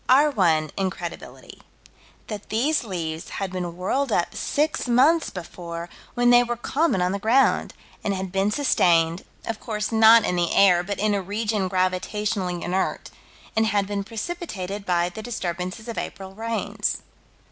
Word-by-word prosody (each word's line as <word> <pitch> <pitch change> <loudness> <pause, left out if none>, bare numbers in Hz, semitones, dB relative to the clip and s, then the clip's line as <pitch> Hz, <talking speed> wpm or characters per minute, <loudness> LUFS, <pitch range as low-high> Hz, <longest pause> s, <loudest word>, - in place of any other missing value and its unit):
Our 285 +4 +6
one 160 - +2
incredibility: 175 -3 -5 0.6
That 210 -2 -7
these 270 +8 +1
leaves 165 -6 -4
had 195 -2 -3
been 175 -2 -4
whirled 260 +8 0
up 175 - +1
six 300 -1 -1
months 280 +8 +4
before, 170 -2 -7 0.3
when 245 0 +4
they 245 0 +8
were 240 0 -2
common 270 - +1
on 180 - +1
the 200 - -2
ground, 235 +6 +2 0.3
and 205 - 0
had 190 -1 -3
been 195 +2 +1
sustained, 170 - +2 0.2
of 225 -1 -4
course 215 -1 -3
not 225 0 +7
in 180 - 0
the 175 -1 +1
air, 180 -3 +6
but 200 +2 -4
in 210 +1 +1
a 200 - 0
region 205 0 -1
gravitationally 185 0 -1
inert; 185 +2 -2 0.4
and 220 0 +3
had 200 -1 +1
been 200 0 -3
precipitated 210 - -5
by 175 -1 +2
the 200 +5 -8
disturbances 185 -2 -4
of 230 - -3
April 190 0 -7
rains. 225 +2 -2
200 Hz, 160 wpm, -24 LUFS, 180-230 Hz, 0.6 s, they